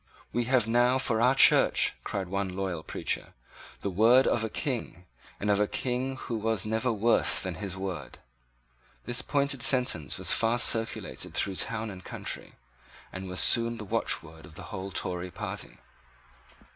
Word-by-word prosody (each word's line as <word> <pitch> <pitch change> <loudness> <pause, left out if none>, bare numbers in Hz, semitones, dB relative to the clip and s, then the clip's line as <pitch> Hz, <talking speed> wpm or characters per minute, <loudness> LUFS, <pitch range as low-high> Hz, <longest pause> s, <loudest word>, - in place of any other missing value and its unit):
"We 120 0 0
have 125 -2 +2
now 120 +2 +3
for 115 -4 0
our 125 +3 +4
Church," - - +5
cried 95 -3 -4
one 100 +1 -2
loyal 95 -4 -3
preacher, - - -4 0.5
"the 100 - -2
word 115 +7 +5
of 115 - +1
a 110 - -2
King, 115 - -4 0.3
and 105 - -3
of 100 - +2
a 105 - +2
King 130 +3 -2
who 115 - -4
was 110 -2 0
never 110 +3 0
worse 115 +2 +2
than 95 -2 -3
his 95 -2 -4
word." 90 -7 -6 0.9
This 120 +1 -1
pointed 140 -2 0
sentence 125 - +2
was - - +4
fast 115 +1 +4
circulated 115 -1 -2
through 95 -2 -1
town 115 -1 -1
and 90 -1 -11
country, - - -6 0.6
and 95 0 -6
was 90 - -2
soon 115 0 +4
the 110 - -7
watchword 80 -4 -2
of 80 - -14
the 100 - -9
whole 95 +1 -5
Tory 90 -1 -3
party. - - -7
110 Hz, 165 wpm, -28 LUFS, 95-120 Hz, 0.9 s, Church